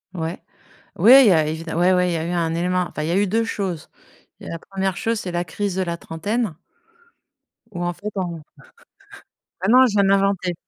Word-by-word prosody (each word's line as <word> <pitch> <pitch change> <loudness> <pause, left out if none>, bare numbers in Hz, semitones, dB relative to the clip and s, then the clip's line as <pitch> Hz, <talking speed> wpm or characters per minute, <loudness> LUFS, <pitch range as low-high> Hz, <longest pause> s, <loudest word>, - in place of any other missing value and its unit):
Ouais, 165 +1 -4 0.6
ouais, 260 +3 +8
il - - +5
y - - +5
a 160 -3 +3
évide 160 +2 -5
ouais, 175 +3 +3
ouais, 180 0 +2
il - - -1
y - - -1
a 160 - -3
eu 175 - -3
un 165 -2 -1
élément. 180 +1 0
Enfin, 150 - -5
il 160 - -3
y - - 0
a 180 - +1
eu 205 0 +2
2 225 +4 +1
choses. 185 -7 -4 0.5
Il - - -11
y - - -6
a - - -5
la 165 - -6
1re 190 -1 -3
chose, 230 -2 -1
c'est 180 - -5
la 175 0 -2
crise 200 +2 -3
de 190 - 0
la 170 -1 -4
trentaine 195 +5 -3 1.2
où 175 -2 -5
en 175 0 -1
fait, 210 +4 -7
on 175 -4 -4 1.2
Ah 190 - -1
non, 255 +3 +6
je - - -2
viens 200 -1 +3
de - - +2
l'inventer. 195 -2 +1
180 Hz, 240 wpm, -21 LUFS, 170-200 Hz, 1.2 s, ouais